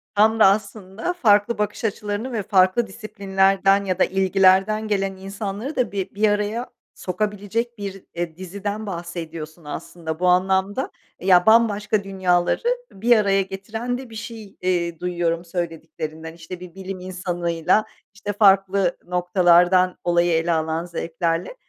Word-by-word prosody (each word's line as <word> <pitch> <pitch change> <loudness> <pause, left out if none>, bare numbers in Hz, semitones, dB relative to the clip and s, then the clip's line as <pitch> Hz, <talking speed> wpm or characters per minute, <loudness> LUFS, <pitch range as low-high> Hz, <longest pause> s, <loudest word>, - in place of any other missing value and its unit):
Tam 220 +2 +4
da - - +8
aslında 200 - 0
farklı 220 -7 +3
bakış 210 +1 -2
açılarını 210 +3 -3
ve 220 -4 -2
farklı 190 +4 +3
disiplinlerden 195 -1 +1
ya 185 -1 -2
da - - +6
ilgilerden 195 +3 +3
gelen 195 -2 -1
insanları 200 +7 -5
da 250 - 0
bir 195 0 -4
bir 215 +1 +3
araya 210 +4 -1 0.3
sokabilecek 210 +4 -3
bir, 195 -2 -6
eee, 170 -2 -4
diziden 200 +3 -5
bahsediyorsun 170 -3 -7
aslında 160 +1 -6
bu 180 - +1
anlamda. 190 +6 +1 0.3
Eee, 185 - -7
ya, 180 -2 +6
bambaşka 215 -2 +3
dünyaları 185 - +1 0.3
bir 230 +4 +3
araya 195 -2 +3
getiren 215 +6 -4
de 260 -1 -9
bir 225 - -11
şey, 220 -2 -8
eee, 170 -2 -1
duyuyorum 175 -1 -1
söylediklerinden, 160 -2 -5
işte, 170 +2 -9
bir 180 -1 -11
bilim 190 0 -6
insanıyla, 175 0 0 0.3
işte, 205 0 -5
farklı 195 -2 +3
noktalardan 180 0 +3
olayı 175 0 +2
ele 165 +1 +1
alan 160 +1 -1
zevklerle. 165 - -2
190 Hz, 140 wpm, -22 LUFS, 175-205 Hz, 0.3 s, da